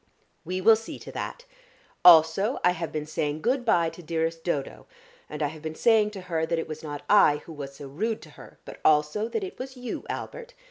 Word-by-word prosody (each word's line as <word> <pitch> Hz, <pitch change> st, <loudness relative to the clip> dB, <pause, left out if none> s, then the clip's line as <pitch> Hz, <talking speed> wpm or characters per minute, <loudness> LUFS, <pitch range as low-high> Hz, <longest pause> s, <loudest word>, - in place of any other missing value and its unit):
"We 185 Hz, +2 st, -3 dB
will 225 Hz, +4 st, +7 dB
see 225 Hz, +1 st, -8 dB
to -, -, -10 dB
that. -, -, -6 dB, 0.6 s
Also, 175 Hz, -, +6 dB
I 180 Hz, -, +5 dB
have 170 Hz, -2 st, -4 dB
been 155 Hz, -1 st, -3 dB
saying 150 Hz, 0 st, -3 dB
good 250 Hz, +3 st, +1 dB
bye 170 Hz, -8 st, +2 dB
to 165 Hz, -, -12 dB
dearest 165 Hz, 0 st, -2 dB
Dodo, 145 Hz, -6 st, -3 dB, 0.4 s
and 150 Hz, 0 st, -4 dB
I 145 Hz, -, +1 dB
have 155 Hz, +1 st, -11 dB
been 160 Hz, 0 st, -5 dB
saying 220 Hz, 0 st, +4 dB
to -, -, -7 dB
her 165 Hz, -3 st, -2 dB
that 165 Hz, +1 st, 0 dB
it 165 Hz, -, -3 dB
was 155 Hz, 0 st, -7 dB
not 145 Hz, -2 st, -7 dB
I 150 Hz, -8 st, +5 dB
who 165 Hz, -, -9 dB
was 140 Hz, -2 st, -8 dB
so 140 Hz, -, -9 dB
rude 215 Hz, +11 st, -3 dB
to -, -, -14 dB
her, -, -, -14 dB
but -, -, -10 dB
also 150 Hz, +8 st, +3 dB
that 395 Hz, -, -3 dB
it 380 Hz, -, -7 dB
was 260 Hz, 0 st, -7 dB
you, 250 Hz, -1 st, -5 dB
Albert. -, -, -6 dB
165 Hz, 225 wpm, -26 LUFS, 155-220 Hz, 0.6 s, will